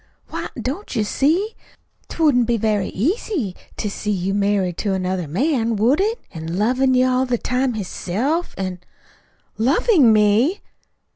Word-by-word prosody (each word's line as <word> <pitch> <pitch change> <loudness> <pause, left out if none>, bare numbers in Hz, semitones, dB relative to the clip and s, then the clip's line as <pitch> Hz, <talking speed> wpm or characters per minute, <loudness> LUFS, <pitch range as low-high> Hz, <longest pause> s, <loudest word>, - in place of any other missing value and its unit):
"Why, - - -5
don't 285 +6 -4
you 220 - +2
see? 330 - +1 0.5
'T 330 - -3
wouldn't 250 -6 +4
be 235 -1 +2
very 210 -3 0
easy 280 - -2 0.2
to 215 - -2
see 210 +1 -4
you 195 -1 0
married 200 -3 0
to 200 -3 0
another 185 -2 -2
man, 230 - 0
would 245 - +3
it? 445 +4 0
an' 165 +2 -5
lovin' 255 +5 +2
you 255 0 +4
all 255 0 +1
the 245 -1 +1
time 250 +1 -1
hisself, 220 - -2
an' 185 -2 -3 0.4
" - - -37 0.3
"LOVING 275 - +4
ME!" 220 - +3
230 Hz, 155 wpm, -21 LUFS, 200-275 Hz, 0.5 s, wouldn't